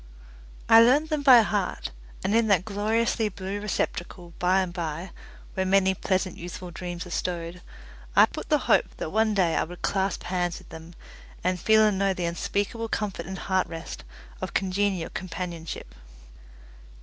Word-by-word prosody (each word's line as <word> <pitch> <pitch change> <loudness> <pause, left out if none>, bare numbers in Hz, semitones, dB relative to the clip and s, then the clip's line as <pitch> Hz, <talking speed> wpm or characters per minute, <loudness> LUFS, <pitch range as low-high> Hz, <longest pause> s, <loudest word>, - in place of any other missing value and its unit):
I 225 0 +9
learnt 285 +7 +4
them 305 -1 +1
by 260 -4 +8
heart, 205 -3 -2 0.3
and 205 - 0
in 230 0 +3
that 190 -4 +3
gloriously 220 +2 0
blue 195 +1 -5
receptacle, 175 -3 -3
by 185 +2 +3
and 180 -2 -3
by, 170 0 -4 0.4
where 190 - 0
many 190 0 +3
pleasant 185 -1 -1
youthful 175 +1 -7
dreams 175 0 -6
are 180 - -10
stowed, 175 0 -3 0.5
I - - +8
put - - -8
the - - +5
hope - - +2
that 155 - -4
one 220 0 +2
day 175 -4 +2
I - - +2
would 175 +2 -10
clasp 195 0 0
hands 175 -2 -1
with - - -14
them, 165 +1 -11 0.5
and 180 +1 0
feel 220 +4 +5
and 205 -3 +1
know 195 -1 +2
the 180 - -2
unspeakable 205 +6 -2
comfort 195 -7 -3
and 190 0 -5
heart 185 0 0
rest 165 0 -7 0.4
of - - -5
congenial 190 -2 0
companionship. 170 -2 -6
190 Hz, 165 wpm, -26 LUFS, 175-205 Hz, 0.5 s, I